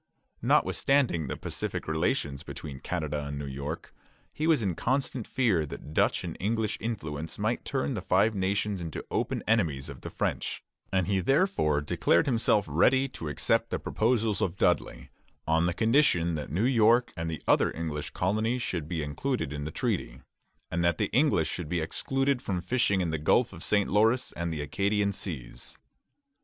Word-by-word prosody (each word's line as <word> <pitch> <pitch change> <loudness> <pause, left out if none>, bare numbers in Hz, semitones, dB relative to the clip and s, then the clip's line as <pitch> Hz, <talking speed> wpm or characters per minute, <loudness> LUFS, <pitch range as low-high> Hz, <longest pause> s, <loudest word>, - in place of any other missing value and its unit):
Notwithstanding 125 - +2
the - - -4
pacific - - -4
relations 70 -3 0
between 70 -4 -8
Canada 75 -3 -3
and 70 0 -4
New 70 - -4
York, 70 +4 -6 0.4
he 155 - -1
was 155 -8 +3
in 95 -3 0
constant 130 - -1
fear 110 -11 +2
that 75 - -9
Dutch - - +2
and - - -5
English 110 +1 0
influence 80 -9 -4
might - - -1
turn 70 - -1
the - - -3
Five 100 +4 +3
Nations 100 0 -1
into 80 -2 -5
open - - -1
enemies 85 -12 +1
of - - -9
the - - -6
French; - - -2 0.3
and 95 -2 +2
he 100 0 +1
therefore 135 - +2
declared 85 +3 +2
himself 115 -5 +2
ready 130 - +3
to 80 -10 -6
accept 70 - +1
the - - -1
proposals 110 -2 0
of 90 -1 0
Dudley, 65 -7 0 0.3
on 80 +2 +2
condition 110 - +3
that 75 -2 -4
New 90 - 0
York 120 -1 +4
and 80 -1 -3
the 80 -2 -5
other - - +4
English 75 -3 -3
colonies 110 +6 0
should 85 -5 -3
be 80 -2 -2
included 80 - -2
in 75 -1 -4
the - - -3
treaty, - - -2 0.5
and 85 +1 0
that 85 -1 +2
the - - -1
English 130 - +3
should 85 -4 -4
be 90 - 0
excluded 135 - -1
from 95 -6 -2
fishing 100 -2 +1
in 85 -3 -1
the 80 - -2
Gulf 120 +11 +2
of - - -8
St. 105 -1 +2
Lawrence 110 +5 +2
and 85 0 -3
the 75 -2 -3
Acadian 100 +7 0
seas. 65 -11 -6
90 Hz, 175 wpm, -28 LUFS, 80-115 Hz, 0.5 s, York